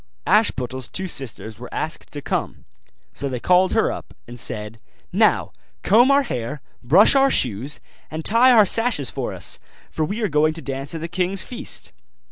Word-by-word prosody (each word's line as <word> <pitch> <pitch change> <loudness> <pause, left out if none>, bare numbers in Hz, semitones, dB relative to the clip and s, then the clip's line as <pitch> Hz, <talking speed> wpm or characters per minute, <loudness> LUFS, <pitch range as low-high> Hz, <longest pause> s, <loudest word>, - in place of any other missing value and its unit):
Ashputtel's 130 0 +1
two 190 0 -3
sisters 115 - -4
were 125 - -9
asked 155 - -5
to 145 -1 -7
come; - - -3 0.5
so 140 - -4
they 125 -2 -4
called 185 +6 +3
her - - +2
up, - - -9
and 120 +1 -9
said, 105 0 -4 0.3
'Now, - - +2 0.3
comb 230 +8 +5
our 280 0 +4
hair, 125 - -4 0.2
brush 165 - +6
our 275 0 +4
shoes, 125 - 0 0.3
and 155 +1 -6
tie 240 +4 +5
our 220 -4 +7
sashes 225 - 0
for - - -4
us, - - -3 0.3
for 160 - -2
we 200 +9 -3
are - - +2
going 155 -1 +2
to 165 - -6
dance 135 +3 -5
at 160 - -5
the 165 - -3
king's 185 +2 -1
feast. 245 - -4
155 Hz, 180 wpm, -21 LUFS, 130-200 Hz, 0.5 s, our